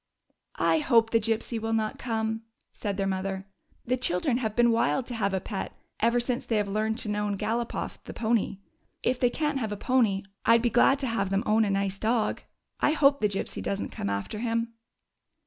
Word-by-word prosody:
" - - -52 0.2
I - - +3
hope 230 -6 +3
the 230 - +4
Gypsy 225 +1 -1
will 225 0 -1
not 220 -1 -1
come," 225 -2 -2 0.3
said 200 -3 -4
their 195 - 0
mother. 190 0 -2 0.2
" - - -38
The 255 +2 +1
children 240 +2 0
have 220 -4 -2
been 240 -1 +5
wild 235 +2 +1
to 250 - -5
have 205 -4 0
a 190 - 0
pet 195 +1 -5 0.3
ever 235 +2 +3
since 240 0 -1
they 225 - -1
have 210 -1 +1
learned 215 +2 0
to 230 - -4
known 210 -1 -1
Galopoff, 225 +3 -2
the - - -7
pony. 220 -3 0 0.5
If 250 0 +1
they 245 - +4
can't 295 +1 -1
have 220 -4 -2
a 205 - -3
pony, 220 -5 +2 0.2
I 230 +1 +6
'd 230 - -3
be 240 - +2
glad 270 +3 +5
to 265 - 0
have 205 -5 0
them 195 +1 +1
own 220 +1 +3
a - - -1
nice 195 0 0
dog. 225 0 0 0.4
I 300 - +3
hope 280 -2 +4
the 210 - +2
Gypsy 195 - -3
does 200 - -2
n't - - -4
come 100 - -3
after 100 - -3
him." 230 0 -1
225 Hz, 220 wpm, -27 LUFS, 200-240 Hz, 0.5 s, I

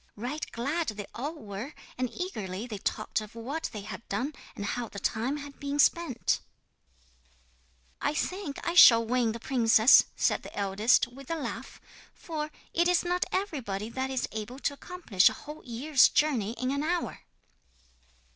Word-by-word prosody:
Right 250 +8 -4
glad 290 +8 -1
they 210 -2 -4
all 290 +7 -4
were, 215 +1 -7 0.2
and 255 0 -1
eagerly 215 - -4
they 215 -5 -6
talked 215 +2 -1
of 215 +1 -11
what 270 +8 -4
they 210 - -6
had 215 +2 -7
done, 250 +10 -2 0.2
and 205 - -4
how 240 +3 -2
the - - -10
time 235 +8 -1
had 285 -1 -9
been 285 0 -3
spent. 290 -5 +2 1.6
'"I 300 - 0
think 365 -4 -3
I 340 - +1
shall 230 -9 +9
win 240 -1 +1
the 230 - -6
princess," 230 0 +6
said - - +1
the - - -11
eldest, 200 +4 +3
with 265 +2 -13
a 330 - 0
laugh, 310 - -6 0.4
"for 305 -2 -4 0.2
it 345 +1 +3
is 360 0 +3
not 355 +1 +1
everybody 250 - -2
that 260 +2 -3
is 260 -2 -1
able 220 +4 -5
to 285 - -1
accomplish 280 - +2
a - - -6
whole 300 +1 -10
year's 260 +3 +4
journey 245 -8 +1
in 255 +2 -2
an 280 +1 -1
hour!" 340 +3 -1
255 Hz, 165 wpm, -29 LUFS, 220-305 Hz, 1.6 s, shall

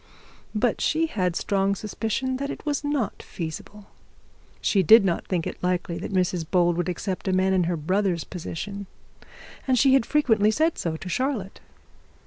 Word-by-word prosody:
But 230 +2 +1
she 320 +1 +2
had 185 - -1
strong 195 +1 +1
suspicion 225 +5 -2
that 280 +1 -3
it - - -7
was 295 -1 -1
not 290 -7 -1
feasible. 180 +5 -7 0.7
She 195 - +2
did 220 +4 +7
not 175 -3 -1
think 175 -3 -1
it - - -6
likely 180 -1 -1
that - - -5
Mrs 180 -2 +1
Bold 175 -1 +3
would 175 +1 -1
accept 185 +2 -4
a - - +2
man 190 +1 +2
in 180 -2 +2
her 170 0 -1
brother's 185 +2 0
position, 200 +3 -6 0.8
and 260 -1 +3
she 265 +2 +5
had 270 -4 +3
frequently 225 -8 +3
said 315 +9 +1
so 160 -2 -2
to 185 - -9
Charlotte. 230 -2 -2
195 Hz, 170 wpm, -25 LUFS, 180-240 Hz, 0.8 s, did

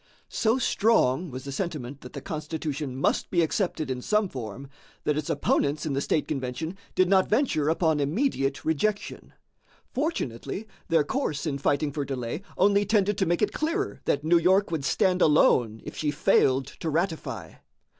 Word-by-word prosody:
So 225 +2 +1
strong 190 - +2
was 130 -1 -7
the 140 - -6
sentiment 140 -5 -4
that 125 - -11
the - - -6
Constitution 150 -4 -4
must 135 - 0
be 175 -2 +3
accepted 160 -4 -1
in 125 -1 -3
some 210 +5 +1
form, 125 - -7 0.4
that 150 - +1
its 150 0 -3
opponents 145 +1 +1
in 150 - -1
the 135 - 0
state 150 - 0
convention 145 +5 -3 0.2
did 185 - +4
not 190 0 +3
venture 210 - +2
upon 160 -2 +2
immediate 145 - 0
rejection. 200 +7 -1 0.6
Fortunately, 215 - -3 0.2
their 165 -3 +3
course 150 - -2
in 140 -3 -2
fighting 145 +1 +1
for 145 0 -2
delay 130 +2 -4 0.2
only 200 +1 +4
tended 205 -1 +2
to 190 - +2
make 175 +4 +1
it 210 - +1
clearer 365 +6 -2
that 145 - +1
New 170 +2 +4
York 190 +3 +3
would 155 -4 -2
stand 185 0 +2
alone 120 -7 +4
if - - -8
she 150 - -1
failed 135 -2 +3
to 165 - -2
ratify. 165 +1 -3
155 Hz, 170 wpm, -26 LUFS, 140-190 Hz, 0.6 s, did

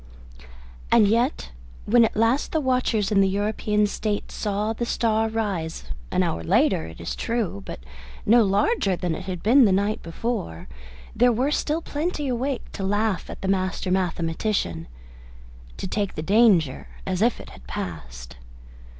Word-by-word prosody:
And 210 - +6
yet, 235 - 0 0.3
when 235 +2 +5
at - - -3
last 230 +6 +1
the 320 - +2
watchers 250 -6 +1
in 200 -2 +4
the 195 - +3
European 210 +1 0
States 205 0 -3
saw 210 +1 -1
the 235 - -4
star 225 -1 +1
rise, 200 -8 -3 0.3
an - - +1
hour 80 - -2
later, 80 0 +2
it 80 - -11
is 85 - -4
true, 230 - -2
but - - -7 0.4
no 230 +2 +6
larger 200 - +2
than 175 -1 -2
it 185 - -6
had 185 -2 -5
been 250 +4 +6
the 200 - +3
night 200 +3 +1
before, 165 - -4 0.5
there 245 +1 +5
were 255 +5 0
still 310 +2 -1
plenty 300 -1 -2
awake 255 +1 -2
to 195 - -6
laugh 205 0 0
at - - -9
the - - -1
master 185 -1 -1
mathematician 170 - -1 0.9
to - - -5
take 200 +1 -2
the 155 - -4
danger 190 - +3 0.2
as 185 0 -2
if 235 +2 +2
it - - -11
had 60 -1 -15
passed. 65 -9 -7
205 Hz, 160 wpm, -24 LUFS, 180-235 Hz, 0.9 s, And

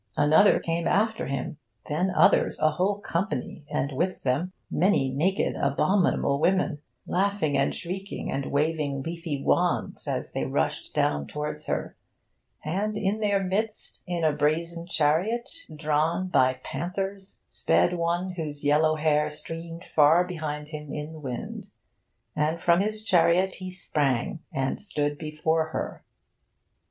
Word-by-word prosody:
Another 155 +7 +5
came 165 0 -1
after 220 - +1
him. 140 +1 -3 0.3
Then 170 +6 0
others, 185 - +4
a 155 - +4
whole 190 +6 0
company, 170 - -3
and 140 - -1
with 175 +7 -1
them 145 +8 0 0.2
many 175 -8 +2
naked, 175 +9 +1
abominable 140 0 +2
women, 180 -2 +2 0.3
laughing 190 -6 +1
and 135 - +1
shrieking 190 +3 -5
and 135 0 -2
waving 145 -2 0
leafy 165 -3 -4
wands, - - +1
as - - -2
they - - -2
rushed - - -2
down 70 -1 +1
towards 150 0 -5
her. - - -2 0.7
And 205 +7 -1
in 205 +1 0
their 205 -2 +1
midst, 210 +4 -3
in 175 -2 -2
a 155 - +4
brazen 165 +3 -1
chariot 180 +10 +1 0.3
drawn 160 +4 0
by 130 -6 +3
panthers, 190 +5 -4
sped 175 - +2
one 175 +2 0
whose 150 -5 -5
yellow 155 +2 +4
hair 150 -1 +2
streamed 165 +3 -7
far 155 +3 +5
behind 150 -4 -5
him 150 -2 -7
in 150 +2 -5
the 160 - -9
wind. 130 -5 -6 0.7
And 155 +2 0
from 170 0 +4
his 215 +1 -2
chariot 185 -1 +3
he 185 0 -7
sprang 150 -6 -1
and 135 0 -1
stood 145 -7 -2
before 160 +1 0
her. 160 - -5
165 Hz, 140 wpm, -27 LUFS, 150-185 Hz, 0.7 s, Another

